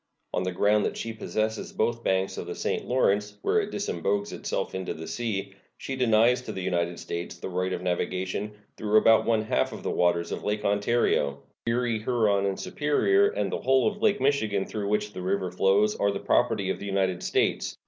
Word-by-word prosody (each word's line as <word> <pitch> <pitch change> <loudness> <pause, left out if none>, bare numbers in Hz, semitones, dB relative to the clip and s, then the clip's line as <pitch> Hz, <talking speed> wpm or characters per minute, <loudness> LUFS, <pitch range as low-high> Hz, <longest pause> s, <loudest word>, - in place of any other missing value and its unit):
On - - 0
the 90 0 -1
ground 105 +3 +3
that - - -2
she 115 - -4
possesses 110 0 -2
both 115 +1 0
banks 95 0 0
of - - -6
the - - -5
St. - - -2
Lawrence, 105 -4 +1
where 215 - +3
it 205 - -4
disembogues 100 - -2
itself - - -3
into 95 -1 -4
the 80 - -7
sea, 100 -4 -3 0.2
she 135 - -5
denies 120 0 +3
to - - -6
the 95 - -5
United 85 -1 -1
States 85 0 -5
the - - -6
right 90 +1 -1
of 90 - -3
navigation, 95 +3 -2 0.3
though 105 0 -1
about 110 +1 +5
one 110 -2 +2
half 110 - 0
of - - -8
the - - -1
waters 85 -1 +1
of - - -4
Lakes 105 0 -2
Ontario. 100 -9 +1 0.2
Erie, 115 -1 +1
Huron, 105 -4 +1
and 95 - -2
Superior, 390 - +2
and 450 - -2
the - - -3
whole 130 0 +3
of 210 -1 -3
Lake 205 - +3
Michigan, 110 -8 +1
through 105 -2 -4
which 105 0 0
the 90 - -6
river 95 0 -1
flows, 100 +3 +3
are 100 - +1
the 100 -1 -2
property 110 -6 +1
of - - -4
the 100 - -6
United 95 -2 0
States. - - 0
105 Hz, 205 wpm, -27 LUFS, 95-115 Hz, 0.3 s, about